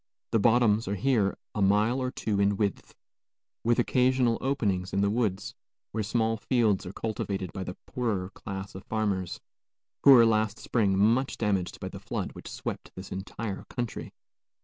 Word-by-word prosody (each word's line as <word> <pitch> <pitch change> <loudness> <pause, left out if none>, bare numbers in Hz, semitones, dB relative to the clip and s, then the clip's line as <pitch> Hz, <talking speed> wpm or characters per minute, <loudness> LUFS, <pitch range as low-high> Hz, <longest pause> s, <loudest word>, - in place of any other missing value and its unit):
The 115 - +3
bottoms 115 -1 +4
are 100 - -1
here 105 -2 +1 0.2
a 105 - -2
mile 105 +6 +3
or 130 - 0
two 105 -5 -2
in 100 0 +2
width, 100 -2 -2 0.7
with 120 +1 +3
occasional 125 -1 +2
openings 100 -9 -1
in 100 - +2
the 100 0 +2
woods, 105 -4 -1 0.4
where 110 - -2
small 110 +1 0
fields 110 -4 +1
are - - -5
cultivated 100 -4 -3
by 95 - -4
the 90 - -6
poorer 105 -7 -2
class 95 -1 -7
of 95 - -9
farmers, 100 -5 -1 0.6
who - - +7
were 125 -4 +9
last 110 -1 +2
spring 100 -5 +1
much 115 +7 +2
damaged 100 -5 -1
by - - -5
the - - -8
flood - - -4
which - - -10
swept - - -5
this 95 +1 -9
entire 100 +2 -5
country. 120 -2 -5
105 Hz, 170 wpm, -28 LUFS, 100-120 Hz, 0.7 s, were